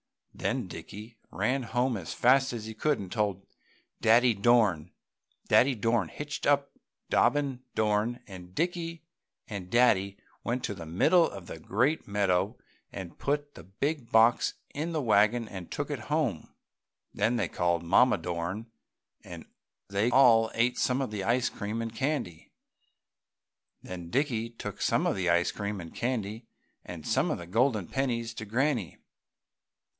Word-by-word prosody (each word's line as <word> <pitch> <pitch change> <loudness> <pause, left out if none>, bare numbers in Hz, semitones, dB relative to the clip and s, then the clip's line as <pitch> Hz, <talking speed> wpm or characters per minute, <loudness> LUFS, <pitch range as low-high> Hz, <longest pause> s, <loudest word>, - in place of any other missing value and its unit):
Then - - -2
Dickie 110 +2 -10
ran 135 +2 0
home 125 +1 0
as 90 -6 -5
fast 130 +1 +4
as 115 -2 -5
he 110 - -6
could 150 +6 +1
and 95 -3 -8
told 100 -4 -1 0.6
Daddy 120 +2 +5
Dorn. 100 -7 +3 0.6
Daddy 130 +1 +4
Dorn 115 -3 +1
hitched 145 - -5
up 140 -1 +2 0.4
Dobbin 135 0 +2
Dorn 110 +3 +1
and 90 -2 -11
Dickie 165 0 -2 0.4
and 100 -4 -6
Daddy 100 -4 +3 0.3
went 125 +2 -2
to - - -2
the 85 -5 -9
middle 160 - +4
of 95 -3 -9
the 80 - -8
great 125 - 0
meadow 100 -3 +1 0.3
and 95 -4 -8
put 145 0 -1
the - - -11
big 135 - -3
box 115 +2 +4 0.2
in 160 +4 -3
the 155 - 0
wagon 110 +1 +3
and 95 -4 -8
took 145 +1 -4
it 140 - -3
home. 145 - -1 0.6
Then 115 +2 +1
they 110 -7 0
called 85 0 0
Mamma 125 +9 +4
Dorn 90 +6 -4 0.5
and - - -9 0.4
they 100 +4 +1
all 120 -4 +6
ate 120 +2 +1
some 130 +1 +1
of 130 - -3
the 105 -2 -3
ice 120 +4 +2
cream 105 +2 -4
and 115 -1 -5
candy. 130 - -3 1.3
Then 90 -2 -7
Dickie 120 - 0
took 115 - -8
some - - +2
of - - +1
the 90 -2 0
ice 85 0 +3
cream 100 -1 -4
and 85 -2 -9
candy 115 -2 -3 0.4
and 80 -4 -9
some - - +1
of - - -1
the 85 - -8
golden 110 +1 +1
pennies 120 -4 -2
to 110 - -6
Granny. 120 - 0
115 Hz, 155 wpm, -29 LUFS, 100-130 Hz, 1.3 s, all